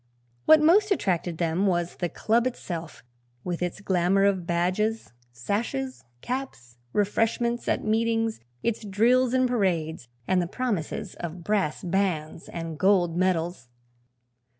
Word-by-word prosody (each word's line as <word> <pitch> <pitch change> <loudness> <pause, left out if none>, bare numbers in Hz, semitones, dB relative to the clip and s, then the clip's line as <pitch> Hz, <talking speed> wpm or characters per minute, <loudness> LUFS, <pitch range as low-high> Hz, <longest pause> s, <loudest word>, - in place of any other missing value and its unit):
What 310 -1 +7
most 400 +6 +5
attracted 175 - 0
them 170 +4 +1
was 175 -2 0
the 175 - -1
club 230 +7 +1
itself, 170 -9 -6 0.4
with 175 -1 -3
its 180 +3 -3
glamour 190 0 +2
of 190 -4 +1
badges, 185 - 0 0.2
sashes, 230 - -3 0.2
caps, 185 - -5
"refreshments" 225 - 0
at - - 0
meetings, 225 0 +1 0.2
its 230 -1 -1
drills 240 +5 +3
and 255 0 +3
parades 170 - -1 0.2
and 185 -1 +3
the 175 - -2
promises 205 - -3
of 170 0 -6
brass 195 -6 0
bands 175 -4 -1
and 165 -2 -6
gold 180 -3 +3
medals. 175 -6 0
190 Hz, 125 wpm, -26 LUFS, 170-225 Hz, 0.4 s, What